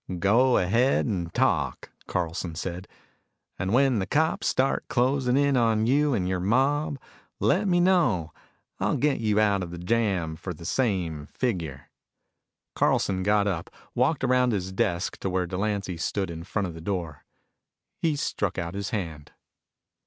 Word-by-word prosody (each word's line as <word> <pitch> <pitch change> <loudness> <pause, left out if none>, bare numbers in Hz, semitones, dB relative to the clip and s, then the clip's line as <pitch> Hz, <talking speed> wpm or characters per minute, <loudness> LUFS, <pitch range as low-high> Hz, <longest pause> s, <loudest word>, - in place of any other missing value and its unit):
"Go 120 +8 +4
ahead 115 +9 +2
and 90 -7 -2
talk," 85 - 0 0.2
Carlson 85 -1 -3
said. 90 +2 -5 0.7
"And 95 -1 -1
when 130 -1 +3
the 95 - -2
cops 160 +2 +1
start 135 +1 +1
closing 130 0 +1
in 140 -1 +3
on 115 -3 +2
you 140 +2 +3
and 90 -4 -1
your 95 0 -1
mob, 135 +9 +1 0.4
let 175 - +2
me 175 -2 +3
know. 130 - +2 0.5
I'll - - +1
get 145 -1 +1
you 105 -2 +1
out 100 -2 +3
of 90 - -4
the 85 - -7
jam 90 -4 0
for 90 +1 -6
the 85 - -11
same 85 - -1
figure." 85 - -3 0.8
Carlson 95 -1 +1
got 105 +1 +2
up, 90 -5 -2 0.2
walked 135 +3 +1
around 125 -1 +3
his 95 -2 -2
desk 90 -2 -1
to 95 - -2
where 90 0 0
Delancy 95 0 -2
stood 95 +2 -2
in 85 0 -7
front 100 0 -2
of 85 - -7
the 80 - -9
door. 85 -6 -4 0.8
He 160 -3 +1
stuck 105 -8 -2
out 85 -1 -3
his 100 0 -3
hand. 80 -8 -5
100 Hz, 160 wpm, -26 LUFS, 90-125 Hz, 0.8 s, Go